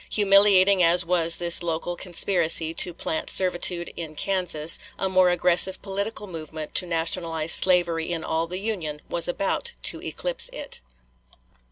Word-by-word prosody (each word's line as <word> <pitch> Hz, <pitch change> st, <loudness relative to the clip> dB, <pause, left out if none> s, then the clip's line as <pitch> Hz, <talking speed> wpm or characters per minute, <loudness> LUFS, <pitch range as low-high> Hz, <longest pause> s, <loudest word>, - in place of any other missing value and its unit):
Humiliating 200 Hz, -2 st, +4 dB
as 170 Hz, +1 st, +4 dB
was 170 Hz, -1 st, +2 dB
this 170 Hz, 0 st, +2 dB
local 170 Hz, +1 st, -4 dB
conspiracy 170 Hz, -3 st, 0 dB
to 175 Hz, -, +1 dB
plant 160 Hz, -1 st, -5 dB
servitude 175 Hz, -1 st, 0 dB
in 160 Hz, -2 st, -9 dB
Kansas, 170 Hz, -3 st, +1 dB, 0.2 s
a 190 Hz, -, -2 dB
more 185 Hz, -1 st, +2 dB
aggressive 180 Hz, +1 st, +3 dB
political 200 Hz, +2 st, -5 dB
movement 155 Hz, -4 st, -9 dB
to 180 Hz, -, +3 dB
nationalize 165 Hz, -1 st, 0 dB
slavery 175 Hz, -2 st, +2 dB
in 165 Hz, -2 st, -4 dB
all 165 Hz, +1 st, -3 dB
the 180 Hz, +2 st, -6 dB
Union 185 Hz, -8 st, -5 dB
was 170 Hz, -, 0 dB
about 195 Hz, -, -3 dB
to -, -, +2 dB
eclipse -, -, -3 dB
it. 295 Hz, -12 st, -7 dB
175 Hz, 145 wpm, -23 LUFS, 165-190 Hz, 0.2 s, Humiliating